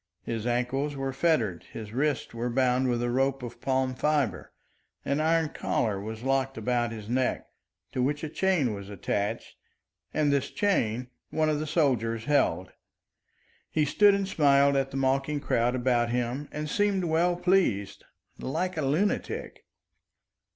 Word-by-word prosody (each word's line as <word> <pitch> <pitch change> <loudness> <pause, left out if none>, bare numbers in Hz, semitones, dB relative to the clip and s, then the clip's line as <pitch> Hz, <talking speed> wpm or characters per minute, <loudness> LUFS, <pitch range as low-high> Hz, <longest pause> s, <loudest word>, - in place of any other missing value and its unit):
His 115 0 -3
ankles 130 +4 -1
were 135 -1 -3
fettered, 125 - +1
his 110 -1 -7
wrists 150 +2 -1
were 120 +1 -2
bound 130 +1 +2
with 120 -1 0
a 120 - 0
rope 135 +1 +1
of 120 0 -8
palm 130 -1 0
fibre, 145 -2 0 0.5
an 140 +1 0
iron 160 0 +2
collar 105 -9 -1
was 110 +2 -6
locked 135 0 0
about 120 +1 0
his 110 -2 -7
neck, 125 +2 0 0.5
to 125 - -1
which 145 +4 0
a 155 - -3
chain 160 - +1
was 100 -1 -8
attached, 100 +1 -3 0.5
and 150 -2 +2
this 140 -2 0
chain 125 - 0 0.2
one 155 -1 +1
of 150 -1 0
the 155 - -3
soldiers 115 -8 +1
held. 130 - +1 1.0
He 155 -1 +1
stood 205 +7 +5
and 200 -1 -1
smiled 140 -5 +4
at 135 -1 +1
the 135 - -5
mocking 135 +2 +1
crowd 120 -2 +1
about 120 -2 +1
him 125 +4 -2
and 150 0 -4
seemed 200 +3 +1
well 170 +2 +2
pleased, 180 - +1 0.4
like 170 +6 -2
a - - 0
lunatic. 155 +9 -1
135 Hz, 155 wpm, -28 LUFS, 120-150 Hz, 1.0 s, stood